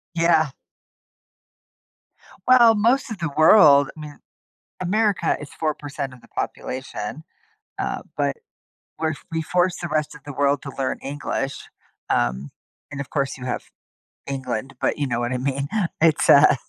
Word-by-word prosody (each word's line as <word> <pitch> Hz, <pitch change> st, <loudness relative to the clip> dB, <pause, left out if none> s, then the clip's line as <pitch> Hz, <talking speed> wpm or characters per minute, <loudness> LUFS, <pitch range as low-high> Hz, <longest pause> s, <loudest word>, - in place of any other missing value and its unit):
Yeah. 165 Hz, -2 st, +3 dB, 2.0 s
Well, 240 Hz, -3 st, +7 dB
most 235 Hz, +4 st, +2 dB
of 220 Hz, -, -4 dB
the 165 Hz, -2 st, -1 dB
world, 150 Hz, -4 st, +7 dB
I -, -, -10 dB
mean 150 Hz, -1 st, -9 dB, 0.6 s
America 200 Hz, -1 st, +1 dB
is 150 Hz, -, -9 dB
4% 145 Hz, -3 st, -3 dB
of 130 Hz, -, -14 dB
the -, -, -20 dB
population, 130 Hz, +1 st, -5 dB, 0.5 s
uh, -, -, -2 dB
but. -, -, 0 dB, 0.6 s
We're 160 Hz, -1 st, 0 dB, 0.2 s
we 160 Hz, 0 st, -1 dB
force 180 Hz, +2 st, +1 dB
the 175 Hz, -, -4 dB
rest 150 Hz, -1 st, -1 dB
of 150 Hz, -, -12 dB
the 145 Hz, -, -7 dB
world 140 Hz, +1 st, +1 dB
to 140 Hz, -, -6 dB
learn 135 Hz, -1 st, -1 dB
English, 140 Hz, -1 st, -3 dB, 0.5 s
um, 65 Hz, +3 st, 0 dB, 0.4 s
and, 140 Hz, -, -5 dB
of 140 Hz, -, -6 dB
course, 140 Hz, -2 st, -1 dB
you 130 Hz, -, -9 dB
have 125 Hz, -, -3 dB, 0.6 s
England, 135 Hz, -1 st, -4 dB
but -, -, 0 dB
you 145 Hz, -, -1 dB
know 120 Hz, -2 st, -1 dB
what 120 Hz, +1 st, -1 dB
I -, -, 0 dB
mean. 140 Hz, +2 st, -2 dB, 0.3 s
It's 160 Hz, -1 st, +3 dB
uh 145 Hz, 0 st, +8 dB
145 Hz, 150 wpm, -23 LUFS, 135-165 Hz, 2.0 s, uh